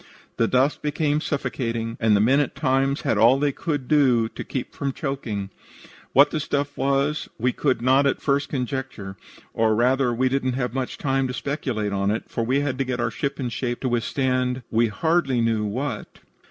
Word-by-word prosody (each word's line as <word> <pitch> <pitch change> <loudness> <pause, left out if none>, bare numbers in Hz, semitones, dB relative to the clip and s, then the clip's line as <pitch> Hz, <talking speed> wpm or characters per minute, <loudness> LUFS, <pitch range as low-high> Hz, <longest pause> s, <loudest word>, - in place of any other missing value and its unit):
The 115 - +3
dust 130 +4 +2
became 150 0 0
suffocating, 115 -6 -2
and 110 -2 +4
the - - +3
men 130 +6 +4
at 145 - -1
times 135 0 +1
had 105 - 0
all 120 +4 +6
they 145 +1 +1
could 145 -3 -3
do 130 -7 +3
to - - -7
keep 130 - -5
from 140 -2 -3
choking. 115 -10 -4 0.6
What 140 +2 +6
the 155 - -1
stuff 145 0 -2
was 140 +2 0
we 125 +2 +1
could 130 -5 0
not 135 +2 +4
at 135 - 0
first 140 0 0
conjecture, 125 -7 -4 0.4
or 110 -1 +2
rather, 125 +2 +2
we 125 +2 +1
didn't 130 -1 0
have 125 -2 -2
much 130 -1 -3
time 135 -1 0
to 125 - -4
speculate 125 -9 -2
on 100 0 0
it, 110 +2 -1
for 115 - -1
we 130 +5 +1
had 135 -2 -2
to - - +2
get 125 -2 -3
our 120 -1 0
ship 140 +2 -3
in 125 -2 -2
shape 120 +1 -3
to 130 - 0
withstand 125 +1 0
we 115 +1 +3
hardly 140 +2 +1
knew 115 -2 +1
what. 130 +8 -4
130 Hz, 195 wpm, -24 LUFS, 115-140 Hz, 0.6 s, all